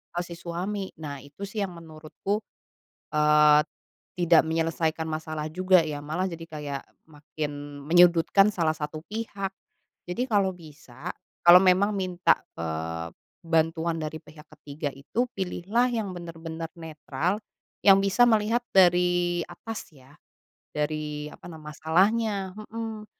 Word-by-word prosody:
atau 175 Hz, -, 0 dB
si 170 Hz, -, -8 dB
suami. 190 Hz, +4 st, -4 dB
Nah, 145 Hz, -3 st, -6 dB
itu 145 Hz, +8 st, -11 dB
sih 200 Hz, +2 st, -5 dB
yang 195 Hz, -3 st, -2 dB
menurutku, 165 Hz, +5 st, -4 dB, 0.7 s
eee, 150 Hz, 0 st, +6 dB, 0.6 s
tidak 170 Hz, -2 st, +5 dB
menyelesaikan 160 Hz, 0 st, 0 dB
masalah 155 Hz, -1 st, -4 dB
juga 185 Hz, +3 st, +4 dB
ya. 145 Hz, -2 st, -4 dB
Malah 160 Hz, +6 st, -2 dB
jadi 170 Hz, -2 st, -6 dB
kayak 145 Hz, -3 st, -5 dB, 0.2 s
makin 145 Hz, -1 st, -7 dB
menyudutkan 175 Hz, +4 st, +5 dB
salah 160 Hz, -3 st, +1 dB
1 155 Hz, 0 st, -5 dB
pihak. 205 Hz, -3 st, -4 dB, 0.6 s
Jadi, 180 Hz, +7 st, -2 dB
kalau 200 Hz, -3 st, +3 dB
bisa, 150 Hz, -2 st, -10 dB, 0.3 s
kalau 175 Hz, +1 st, +10 dB
memang 190 Hz, +2 st, +4 dB
minta, 185 Hz, -2 st, +2 dB, 0.2 s
eee, 80 Hz, +1 st, -4 dB, 0.4 s
bantuan 165 Hz, 0 st, +1 dB
dari 155 Hz, +1 st, -4 dB
pihak 150 Hz, 0 st, -15 dB
ketiga 145 Hz, 0 st, -5 dB
itu, 225 Hz, -, -2 dB
pilihlah 195 Hz, +5 st, 0 dB
yang 220 Hz, -5 st, -2 dB
bener-bener 165 Hz, -1 st, -7 dB
netral, 160 Hz, +3 st, -2 dB, 0.4 s
yang 195 Hz, -1 st, +7 dB
bisa 200 Hz, +4 st, +3 dB
melihat 225 Hz, +1 st, +2 dB
dari 175 Hz, -1 st, +4 dB
atas 225 Hz, -1 st, -8 dB
ya. 135 Hz, +1 st, -18 dB, 0.6 s
Dari 150 Hz, 0 st, -3 dB
apa -, -, -16 dB
na 165 Hz, -, -9 dB
masalahnya, 190 Hz, +7 st, +1 dB
mhm. 220 Hz, 0 st, -6 dB
165 Hz, 125 wpm, -26 LUFS, 150-190 Hz, 0.7 s, kalau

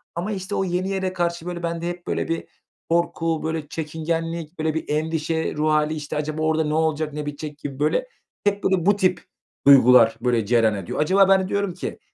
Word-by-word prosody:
Ama, 175 Hz, +5 st, -3 dB
işte, 195 Hz, 0 st, -4 dB
o -, -, +1 dB
yeni 180 Hz, +1 st, -1 dB
yere 190 Hz, -1 st, -2 dB
karşı, 170 Hz, -2 st, -2 dB
böyle, 175 Hz, -1 st, -5 dB
bende 170 Hz, 0 st, -2 dB
hep, 175 Hz, 0 st, -7 dB
böyle, -, -, -1 dB
bir 165 Hz, 0 st, -3 dB, 0.4 s
korku, 165 Hz, -1 st, 0 dB
böyle, 160 Hz, -1 st, -3 dB
çekingenlik, 165 Hz, +1 st, -4 dB
böyle, 155 Hz, 0 st, 0 dB
bir 160 Hz, -, -3 dB
endişe 160 Hz, +1 st, -1 dB
ruh 155 Hz, +1 st, +1 dB
hâli. 155 Hz, 0 st, +2 dB
İşte, 150 Hz, 0 st, -5 dB
"Acaba 155 Hz, +1 st, -3 dB
orada 160 Hz, 0 st, +2 dB
ne 150 Hz, 0 st, -2 dB
olacak, 155 Hz, -1 st, 0 dB
ne 150 Hz, 0 st, -4 dB
bitecek?" 145 Hz, 0 st, -6 dB
gibi, 140 Hz, -2 st, -7 dB
böyle, 155 Hz, -, +1 dB, 0.4 s
hep, 205 Hz, 0 st, 0 dB
böyle, 185 Hz, -3 st, +1 dB
bu 205 Hz, +1 st, +5 dB
tip 185 Hz, -2 st, +1 dB, 0.4 s
duygular, 125 Hz, -4 st, +7 dB
böyle, 120 Hz, -3 st, +1 dB
cereyan 115 Hz, -1 st, +3 dB
ediyor. 95 Hz, -3 st, -5 dB
Acaba 190 Hz, +5 st, +4 dB
ben 190 Hz, -1 st, +5 dB
de -, -, -4 dB
diyorum 200 Hz, -1 st, -1 dB
ki, 180 Hz, -, -6 dB
160 Hz, 205 wpm, -23 LUFS, 150-180 Hz, 0.4 s, duygular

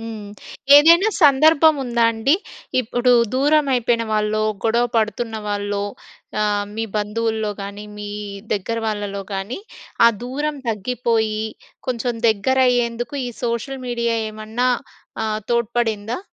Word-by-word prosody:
హ్మ్. 220 Hz, -3 st, -7 dB, 0.5 s
ఏదైనా 335 Hz, +8 st, +7 dB, 0.2 s
సందర్భం 310 Hz, +2 st, +6 dB
ఉందా 235 Hz, -2 st, +1 dB
అండి? 235 Hz, +8 st, +2 dB, 0.5 s
ఇప్పుడు 245 Hz, +1 st, 0 dB, 0.2 s
దూరం 295 Hz, +2 st, +3 dB
అయిపోయిన 235 Hz, -1 st, +1 dB
వాళ్ళో, 215 Hz, 0 st, +1 dB, 0.2 s
గొడవ 235 Hz, +2 st, +3 dB
పడుతున్న 225 Hz, +1 st, -1 dB
వాళ్ళో 205 Hz, 0 st, -2 dB, 0.6 s
ఆహ్, 205 Hz, -1 st, +1 dB
మీ 225 Hz, -, -1 dB
బంధువుల్లో 220 Hz, +1 st, -1 dB
గానీ, 200 Hz, +1 st, -7 dB, 0.2 s
మీ 205 Hz, 0 st, -6 dB, 0.4 s
దగ్గర 215 Hz, +3 st, -2 dB
వాళ్ళలో 205 Hz, -2 st, -3 dB
గానీ, 195 Hz, -, -4 dB, 0.5 s
ఆ -, -, +9 dB, 0.2 s
దూరం 290 Hz, +4 st, -3 dB
తగ్గిపోయి, 220 Hz, 0 st, 0 dB, 0.4 s
కొంచెం 245 Hz, -1 st, -1 dB
దగ్గరయ్యేందుకు 240 Hz, +1 st, +1 dB
ఈ -, -, -3 dB, 0.2 s
సోషల్ 245 Hz, +3 st, -3 dB
మీడియా 235 Hz, -1 st, 0 dB, 0.2 s
ఏమన్నా 220 Hz, +4 st, -2 dB, 0.6 s
ఆహ్, 215 Hz, 0 st, -2 dB
తోడ్పడిందా? 235 Hz, -1 st, 0 dB
230 Hz, 115 wpm, -21 LUFS, 215-250 Hz, 0.6 s, ఆ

